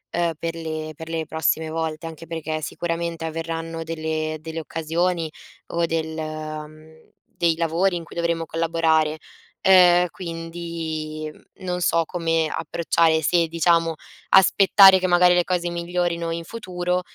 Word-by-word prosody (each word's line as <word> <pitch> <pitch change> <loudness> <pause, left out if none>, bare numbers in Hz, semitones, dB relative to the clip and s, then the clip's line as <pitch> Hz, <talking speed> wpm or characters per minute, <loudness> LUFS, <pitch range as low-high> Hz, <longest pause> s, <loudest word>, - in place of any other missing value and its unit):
ehm, 170 -1 +1
per 165 0 -4
le 155 -1 -5
per 160 +2 -9
le 165 -1 -2
prossime 160 0 0
volte, 160 0 -3
anche 165 0 -10
perché 160 -1 -4
sicuramente 170 0 -3
avverranno 165 0 -4
delle 155 -1 -3
delle 160 +1 -5
occasioni, 165 +1 -1 0.4
o 170 0 0
del 160 -1 -2
mhmm, 155 0 -8
dei 170 -1 0
lavori 170 +3 +1
in 170 - -6
cui - - -14
dovremo 170 -1 -1
collaborare. 160 -1 +1 0.4
Ehm, 180 -2 +6
quindi, 165 -2 -5
mhmm, - - -20 0.2
non 180 -1 -2
so 170 -1 +2
come 165 -2 0
approcciare, 165 0 +1
se, 170 +2 +2
diciamo, 165 0 +2 0.3
aspettare 190 0 +7
che 185 - 0
magari 180 0 +5
le 175 -1 +2
cose 175 -1 -1
migliorino 170 -1 -2
in 165 0 -3
futuro, 180 -4 -2
165 Hz, 140 wpm, -23 LUFS, 160-170 Hz, 0.4 s, aspettare